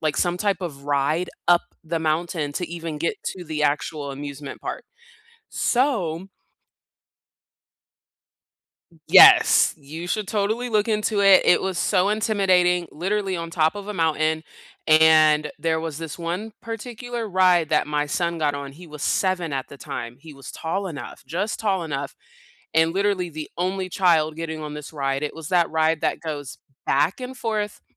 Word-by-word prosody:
like, 155 -2 -1
some 175 -1 0
type 200 -1 0
of 140 -6 -6
ride 145 +5 0 0.2
up 175 0 +5 0.2
the 165 +1 -2
mountain 160 -1 -1
to 180 - -2
even 165 -1 -6
get 165 +3 -1 0.2
to 180 - -8
the 155 -2 -3
actual 150 0 -1
amusement 140 0 -8
park. - - -5 0.6
So 195 - 0 2.8
Yes. - - +8
You 155 +4 -8
should 210 +2 -2
totally 220 +4 -1
look 215 -1 +1
into 215 -1 0
it. 195 -1 +7
It - - +4
was 190 -2 -2
so 190 0 +2
intimidating, 185 -5 +2
literally 190 +3 -1
on 165 -1 -5
top 160 -1 +2
of 205 -1 -8
a 210 - -4
mountain, 160 -2 0 0.4
and 155 -1 +5
there 160 -1 0
was 160 -2 -5
this 165 -2 -6
one 180 +6 -4
particular 235 +1 -5
ride 180 -4 +3
that 150 -2 +2
my 150 0 0
son 170 +3 -1
got 150 -2 +1
on. 140 -1 -6
He 175 +5 -13
was 150 -3 -10
7 185 -3 0
at 135 -1 -3
the 140 - -12
time. 120 -2 -6
He 160 +2 -12
was 135 -3 -10
tall 190 +5 -3
enough, 150 -5 -8
just 195 +6 -3
tall 195 -5 0
enough, 140 -3 -4 0.6
and 160 +1 +3
literally, 195 -2 0
the 155 -1 -7
only 185 +2 -1
child 165 -5 +2
getting 160 -1 -5
on 150 -1 -6
this 150 +1 -9
ride. 135 -1 -1
It 150 - -3
was 160 -2 -8
that 175 -2 +3
ride 160 0 +1
that - - 0
goes 145 -5 -6 0.3
back 150 - +1
and 255 +1 -6
forth, 215 -4 -3
165 Hz, 165 wpm, -23 LUFS, 150-190 Hz, 2.8 s, Yes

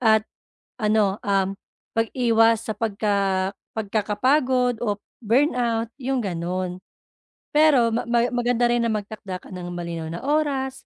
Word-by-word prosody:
at 220 -2 +4 0.6
ano, 210 -2 +2
um, 195 -1 +1 0.4
pag-iwas 225 -1 +3
sa - - +1
pagka 200 -3 0 0.3
pagkakapagod 245 +4 +1
o 210 -4 0 0.2
burnout, 235 -1 +1
yung 265 0 0
ganun. 180 0 -3 0.7
Pero 290 -7 +5
ma 230 - +1
ma 235 0 +3
maganda 245 0 +1
rin 240 0 +2
na - - +1
magtakda 205 -3 -5
ka - - -15
ng 180 -1 -6
malinaw 170 -2 -5
na 170 +1 -5
oras 280 -3 0
225 Hz, 125 wpm, -23 LUFS, 195-245 Hz, 0.7 s, Pero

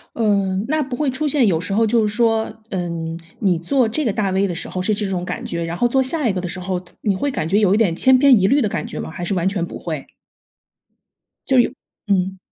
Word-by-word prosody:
呃， 200 -4 +1
那 310 +2 +1
不 260 -3 -3
会 295 -1 0
出 300 +4 -1
现 280 -4 +3
有 165 -4 +2
时 180 +3 -3
候 225 +2 +3
就 220 -1 +2
是 210 - -3
说， 225 -1 +2 0.2
嗯， 170 -3 -4 0.2
你 190 -5 +2
做 245 +7 +1
这 305 +8 -1
个 225 - +2
大 205 -1 0
V 195 +1 +1
的 175 - -4
时 - - -5
候 185 - -3
是 215 +4 +1
这 210 - -2
种 185 -2 -2
感 - - -5
觉， 170 0 -3
然 165 +1 -4
后 240 - +3
做 265 +2 +2
下 270 +1 +1
一 205 - +1
个 185 - -2
的 180 - -4
时 180 +2 -6
候， 185 0 -2
他 180 0 -18
你 200 -2 +1
会 285 +10 -1
感 160 - -2
觉 200 +5 +2
有 200 -2 +3
一 - - +3
点 195 -7 +2
千 260 +6 +5
篇 270 -1 +6
一 190 - +3
律 280 +5 +3
的 - - +2
感 - - -3
觉 - - -6
吗？ - - -5
还 175 - -7
是 185 - -1
完 180 0 0
全 190 -3 -1
不 - - -8
会。 155 -5 -5 1.4
就 265 - +3
有 240 - +2 0.3
嗯。 190 -1 +1
200 Hz, 290 characters per minute, -20 LUFS, 180-240 Hz, 1.4 s, 篇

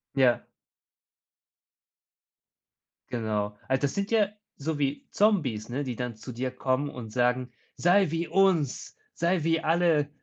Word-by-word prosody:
Ja. 130 -3 +4 2.7
Genau. 105 -3 -2
Also, 130 0 +1
das 140 - 0
sind 200 +2 -2
ja 210 -3 +4 0.3
so 150 +1 -3
wie 140 0 -1
Zombies, 145 - +1
ne, 140 +4 -2
die 125 -3 -4
dann 125 -2 -4
zu 125 +4 -9
dir 125 +2 -3
kommen 130 +2 0
und 120 -5 -8
sagen: 125 0 +1 0.2
„Sei 180 -1 +3
wie 165 +1 -1
uns, 185 -8 +1 0.2
sei 170 -1 +1
wie 165 0 +2
alle. 160 -3 +2
140 Hz, 135 wpm, -28 LUFS, 125-170 Hz, 2.7 s, Ja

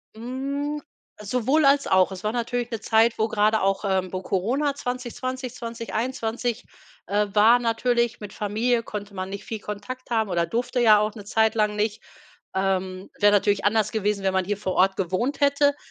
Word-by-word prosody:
Hm, 275 +5 -4 0.4
sowohl 250 +8 +1
als 280 0 +4
auch. 185 0 +4
Es 185 -1 -8
war 215 - 0
natürlich 240 0 -2
'ne 230 - -3
Zeit, 225 +1 +3
wo 220 - +2
gerade 215 0 +2
auch, 195 +1 +1
äh, 190 -2 0
wo 185 - -3
Corona 250 +11 0
2020, 255 -1 -4
2021, 235 0 -3 0.4
äh 205 +2 +1
war 220 +4 +6
natürlich, 235 0 0
mit 205 -1 -7
Familie 225 +4 0
konnte 205 -2 -7
man 185 -1 -4
nicht 200 0 -6
viel 220 - -5
Kontakt 210 +6 -7
haben 220 -3 +1
oder 170 -2 +1
durfte 240 +7 -2
ja 215 -3 +6
auch 210 0 0
'ne 205 -3 -10
Zeit 220 +2 +2
lang 210 -1 +1
nicht. 210 0 -1 0.5
Ähm, 190 0 -1
wäre 205 0 +5
natürlich 205 0 +2
anders 215 0 +2
gewesen, 210 -2 -1
wenn 190 -1 +1
man 190 0 +2
hier 205 +1 -2
vor 190 -2 -3
Ort 190 +1 +3
gewohnt 195 +10 -1
hätte. 285 0 +3
220 Hz, 180 wpm, -24 LUFS, 200-245 Hz, 0.5 s, war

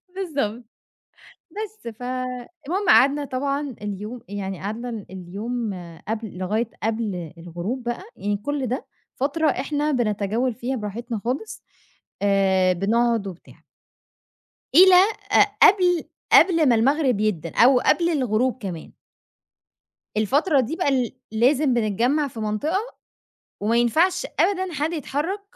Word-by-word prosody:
بالضبط، 275 - -3 0.9
بس، 430 - -7
فالمهم 255 - -4
قعدنا 285 +2 +5
طبعًا 275 0 -2
اليوم 210 +4 -6
يعني 195 -2 -5
قعدنا 220 +5 -4
ال 225 -4 -6
اليوم 205 +5 -4 0.3
قبل 220 -3 -4
لغاية 215 +5 -1
قبل 210 -8 -2
الغروب 175 +9 -5
بقى، 240 +8 -4
يعني 205 0 -2
كُلّ 275 +4 -3
ده 255 +4 -3 0.3
فترة 300 +4 0
إحنا 290 +3 -1
بنتجول 225 0 0
فيها 255 +3 -3
براحتنا 225 +1 -5
خالص، 270 - -4 0.6
آآ، 190 -2 +3
بنقعد 225 +3 +1
وبتاع. 180 -3 -12 1.1
إلى 370 +2 +9 0.4
ق - - +6 0.2
قبل 360 -4 +5 0.3
قبل 330 -5 +6
ما 240 - +5
المغرب 260 0 +2
يأدّن 180 -7 -1
أو 250 +1 +6
قبل 340 +5 +2
الغروب 255 -4 0
كمان. 175 -5 -6 1.3
الفترة 280 - +2
دي 260 +5 -1
بقى 335 -5 +1
ل - - -10 0.2
لازم 255 +4 +3
بنتجمّع 240 +7 +1
في 235 -4 -9
منطقة، 215 - -1 0.8
وما 225 +3 +1
ينفعش 315 +11 +2
أبدًا 375 -3 +1
حد 305 +4 -1
يتحرك 320 +6 -3
245 Hz, 120 wpm, -23 LUFS, 210-290 Hz, 1.3 s, إلى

